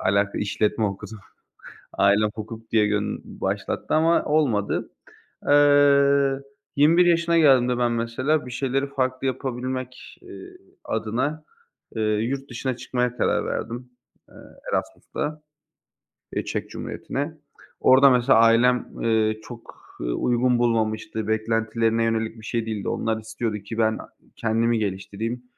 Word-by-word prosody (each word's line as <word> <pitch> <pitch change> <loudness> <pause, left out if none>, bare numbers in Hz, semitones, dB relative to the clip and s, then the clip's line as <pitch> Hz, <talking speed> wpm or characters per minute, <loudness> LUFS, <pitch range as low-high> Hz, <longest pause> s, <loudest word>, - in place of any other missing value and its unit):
alaka 100 +1 +1
işletme 105 +2 0
okudum. 100 +2 -5 0.8
Ailem 100 +2 +3
hukuk 110 +1 -8
diye 105 -2 +3
gön 105 0 -2 0.2
başlattı - - -2
ama 165 +2 +3
olmadı. 135 -10 0 0.6
Eee, 140 -1 +5 0.3
21 165 +5 +5
yaşına 170 -1 +3
geldiğimde 125 -5 +4
ben 120 -1 +1
mesela 125 +6 0
bir 125 - -8
şeyleri 135 +2 -1
farklı 130 -1 -2
yapabilmek, 130 0 -5
eee, 370 0 -12 0.3
adına, 120 +8 -2 0.5
eee, 110 - -2
yurt 115 +6 -1
dışına 130 +1 -3
çıkmaya 125 -1 -2
karar - - +1
verdim, 120 +2 -4 0.4
eee, - - -20 0.4
Erasmus'ta, 150 +1 -3 0.9
eee, - - -1
Çek - - -4
Cumhuriyeti'ne. - - -5 0.5
Orada 135 +2 +6
mesela 125 -2 +4
ailem, 120 +2 +4
eee, 110 -1 +1
çok, 120 -2 -11 0.3
ııı, - - -1
uygun 125 0 +1
bulmamıştı, 110 -2 -1
beklentilerine 115 +1 0
yönelik 115 0 -1
bir 110 - -12
şey 115 0 -2
değildi. 110 -3 -3
Onlar 110 -1 -1
istiyordu 110 0 -3
ki, 105 +3 -8
ben 110 -1 +2
a - - -11 0.3
kendimi 115 +1 +1
geliştireyim, 105 +4 -4
120 Hz, 125 wpm, -24 LUFS, 110-135 Hz, 0.9 s, Orada